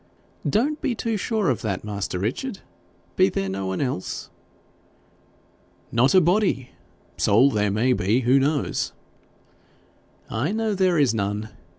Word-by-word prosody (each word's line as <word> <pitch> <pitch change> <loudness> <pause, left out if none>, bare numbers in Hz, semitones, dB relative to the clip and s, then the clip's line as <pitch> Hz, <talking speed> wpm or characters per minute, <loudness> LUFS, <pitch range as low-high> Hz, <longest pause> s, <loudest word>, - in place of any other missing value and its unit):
'Don't 285 +8 +1
be 245 - 0
too 225 0 -2
sure 210 - 0
of 120 - -2
that, 100 -4 -3
master 100 -3 -3
Richard. 130 - -3 0.6
Be 95 - +5
there 95 0 -2
no 95 0 -3
one 95 - -2
else?' 125 -9 -3 1.6
'Not 130 +6 +3
a - - +9
body; 175 - +1 0.5
soul 125 +7 +4
there 105 -1 +1
may 115 +6 +2
be 110 +4 +1
who 130 +3 +4
knows?' 145 +1 0 1.4
'I 135 - -1
know 220 -1 0
there 185 -3 +2
is 140 -6 +3
none. 105 0 -2
130 Hz, 135 wpm, -24 LUFS, -, 1.6 s, a